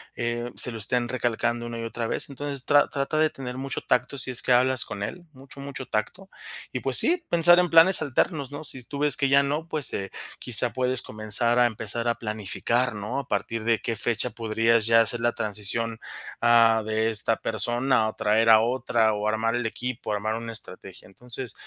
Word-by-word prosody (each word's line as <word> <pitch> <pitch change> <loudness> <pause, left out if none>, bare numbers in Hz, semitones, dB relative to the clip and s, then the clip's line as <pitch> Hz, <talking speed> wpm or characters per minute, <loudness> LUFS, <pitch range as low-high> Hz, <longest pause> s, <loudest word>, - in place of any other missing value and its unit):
eh, 120 0 -3
se 125 - +2
lo 115 - -7
estén 120 +3 0
recalcando 120 -1 -2
una 120 0 -6
y 115 - -5
otra 115 0 -4
vez. - - -3
Entonces, 140 -1 -4
tra 145 0 +4
trata 140 +2 -3
de 155 - +3
tener 125 -3 -8
mucho 135 0 -5
tacto 125 +3 -1
si 130 0 -3
es 125 - +2
que - - -2
hablas 130 0 +3
con 100 - -6
él, 175 - -7
mucho, 135 +1 -15
mucho 140 -2 -7
tacto. 180 - -4 0.4
Y - - -4
pues - - +5
sí, 350 +1 +4
pensar 175 +1 +5
en 180 -1 +1
planes 165 +3 +6
alternos, 145 0 -1
¿no?, 145 - -7
si 135 -3 -4
tú 140 - -9
ves 150 -2 +5
que 140 - 0
ya 140 +1 +5
no, 150 +4 -3
pues, 155 -4 -2
eh, 95 -1 -4 0.3
quizá 120 0 +4
puedes 130 0 0
comenzar 110 +3 0
a 120 - +5
empezar 115 +1 -4
a 115 - +1
planificar, 115 +2 -2
¿no?, 105 +7 -4
a - - -7
partir 110 +3 -3
de 115 0 +1
qué 115 - -3
fecha 120 +3 -1
podrías 115 0 0
ya 115 0 +5
hacer 120 +1 +3
la 120 0 +1
transición, 110 +2 -3 0.4
ah, 115 -1 +4
de 110 +1 -1
esta 110 +1 +2
persona 120 +1 0
o - - -9
traer 110 +2 +1
a 110 -1 +8
otra 115 -2 0
o 105 0 -3
armar 110 +1 -1
el 120 -1 -2
equipo, 120 -1 -5
armar 110 +1 -2
una 115 0 -6
estrategia. 95 -4 -7
Entonces, 120 +3 -6
120 Hz, 210 wpm, -24 LUFS, 110-130 Hz, 0.4 s, a